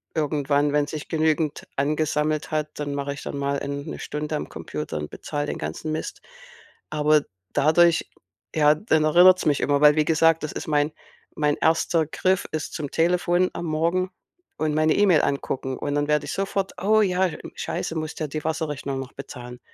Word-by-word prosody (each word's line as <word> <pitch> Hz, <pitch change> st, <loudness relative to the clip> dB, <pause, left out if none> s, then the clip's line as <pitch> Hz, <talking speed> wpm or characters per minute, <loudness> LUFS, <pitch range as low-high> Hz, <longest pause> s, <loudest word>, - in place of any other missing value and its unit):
irgendwann, 145 Hz, -1 st, +1 dB
wenn 145 Hz, 0 st, +2 dB
sich 150 Hz, 0 st, -6 dB
genügend 155 Hz, -1 st, 0 dB
angesammelt 150 Hz, +1 st, 0 dB
hat, 155 Hz, 0 st, -1 dB
dann 145 Hz, -1 st, -3 dB
mache 140 Hz, 0 st, -2 dB
ich 140 Hz, -, -9 dB
dann -, -, -5 dB
mal, 140 Hz, 0 st, -1 dB
ähm, 140 Hz, 0 st, -4 dB
'ne -, -, -6 dB
Stunde 150 Hz, +1 st, -4 dB
am -, -, -5 dB
Computer -, -, -5 dB
und 75 Hz, -, -5 dB
bezahle 145 Hz, -1 st, -4 dB
den -, -, -3 dB
ganzen 80 Hz, -, -4 dB
Mist. 155 Hz, -, -4 dB, 0.7 s
Aber 150 Hz, 0 st, +3 dB, 0.3 s
dadurch, 165 Hz, +3 st, +4 dB, 0.5 s
ja 150 Hz, 0 st, +5 dB
dann 160 Hz, -4 st, +1 dB
erinnert's 180 Hz, +3 st, +6 dB
mich 145 Hz, -2 st, +2 dB
immer, 145 Hz, 0 st, +2 dB
weil 150 Hz, 0 st, +7 dB
wie 155 Hz, -, +3 dB
gesagt, 165 Hz, 0 st, +3 dB
das 155 Hz, -, -3 dB
ist -, -, -6 dB
mein 150 Hz, 0 st, +2 dB, 0.4 s
mein 150 Hz, -1 st, +1 dB
1. 160 Hz, 0 st, +2 dB
Griff 185 Hz, +3 st, 0 dB
ist 155 Hz, -, -3 dB
zum 145 Hz, -3 st, -4 dB
Telefon 175 Hz, +2 st, +2 dB
am 175 Hz, -, -5 dB
Morgen 170 Hz, +4 st, 0 dB, 0.5 s
und 155 Hz, -1 st, 0 dB
meine 155 Hz, 0 st, +3 dB
E-Mail 190 Hz, -7 st, +5 dB
angucken 135 Hz, -1 st, -2 dB
und 145 Hz, 0 st, -2 dB
dann 145 Hz, 0 st, 0 dB
werde 150 Hz, -1 st, +2 dB
ich -, -, -5 dB
sofort: 195 Hz, 0 st, -2 dB
„Oh 215 Hz, +2 st, +4 dB
ja, 190 Hz, -1 st, +2 dB
hm, 165 Hz, -, -8 dB
Scheiße, -, -, -3 dB
musst 155 Hz, 0 st, -4 dB
ja 155 Hz, -, -1 dB
die 155 Hz, +1 st, -5 dB
Wasserrechnung 150 Hz, -4 st, -2 dB
noch 135 Hz, 0 st, -7 dB
bezahlen.“, 125 Hz, -3 st, -9 dB
155 Hz, 185 wpm, -24 LUFS, 145-160 Hz, 0.7 s, weil